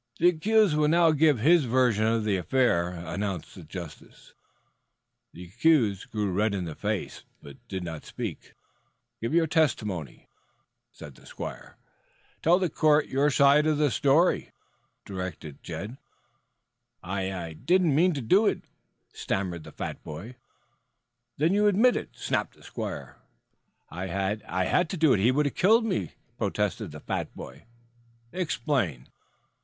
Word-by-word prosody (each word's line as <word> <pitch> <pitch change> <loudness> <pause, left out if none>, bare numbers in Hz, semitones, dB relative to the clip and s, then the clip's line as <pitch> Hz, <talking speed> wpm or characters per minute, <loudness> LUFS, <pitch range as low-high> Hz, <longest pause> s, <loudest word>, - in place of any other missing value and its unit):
"The 175 - +5
accused 200 +1 +2
will 150 0 +3
now 165 +1 +4
give 155 -2 +3
his 160 +2 +5
version 120 -3 +2
of 115 -1 +1
the 105 -2 +1
affair," 90 -3 +1
announced 90 +1 -5
the 95 - -11
justice. 80 -1 -10 1.0
The 85 - -11
accused 110 - +1
grew 105 -3 -2
red 105 +2 +1
in 90 -2 -3
the 80 - -5
face, - - -4 0.2
but 70 -1 -12
did 95 -1 -4
not 80 -3 -6
speak. - - -7 0.7
"Give 115 +8 -1
your 170 -1 +4
testimony." 105 - -1 0.7
"Tell 75 - -9 1.5
the 180 -4 -1
court 150 -1 +3
your 140 +2 +2
side 140 +2 +4
of 155 -1 +2
the 150 -3 +2
story," 145 - +2 0.6
directed 90 -6 -7
Jed. 110 +6 -7 1.1
"I 95 +1 -3
I 85 -4 -5
didn't 175 - +2
mean 175 +5 +3
to 140 - -3
do 195 - +4
it," - - -1 0.5
stammered 90 -4 -3
the - - -11
fat - - -6
boy. 95 +12 -8 1.0
"Then 160 +5 +2
you 210 +1 +3
admit 220 +5 +4
it?" - - -4
snapped - - -2
the - - -20
squire. - - -6 0.7
"I 95 +4 -2
I 95 0 0
had 170 - +1
to 185 - -4
do 155 -4 +4
it, - - +2
or - - 0
he 115 - +4
would 145 +3 +1
have 140 - -1
killed 225 +5 +4
me," 105 - -2 0.3
protested - - -1
the - - -9
fat - - -3
boy. - - -10 0.7
"Explain." 140 - -2
120 Hz, 145 wpm, -27 LUFS, -, 1.5 s, The